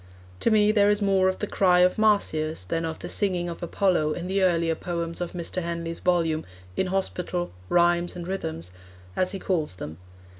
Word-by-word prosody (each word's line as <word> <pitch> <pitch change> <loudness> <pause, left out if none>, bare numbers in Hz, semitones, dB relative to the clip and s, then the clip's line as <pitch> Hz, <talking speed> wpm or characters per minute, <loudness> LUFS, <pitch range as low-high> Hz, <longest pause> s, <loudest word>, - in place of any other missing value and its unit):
To - - +2
me 210 -1 +4
there 205 -1 +4
is 205 0 +2
more 195 -2 +3
of 185 - -2
the - - -2
cry 180 -3 +3
of 180 +3 +3
Marsyas 160 - +1
than 165 - -2
of 160 -1 -4
the - - -7
singing 180 -4 +1
of 170 - -7
Apollo 175 -3 +1
in 175 - -5
the 195 +2 0
earlier 170 -3 +2
poems 170 0 -4
of 175 - -3
Mr. 175 +1 -3
Henley's 170 -1 -4
volume, 165 -3 +1 0.3
In 190 - 0
Hospital: 180 -2 -2 0.2
Rhymes 175 0 +3
and 175 -1 -6
Rhythms, 90 - -4 0.4
as 185 - +1
he 195 - -4
calls 170 - -1
them. 80 -2 -8
175 Hz, 190 wpm, -26 LUFS, 165-190 Hz, 0.4 s, me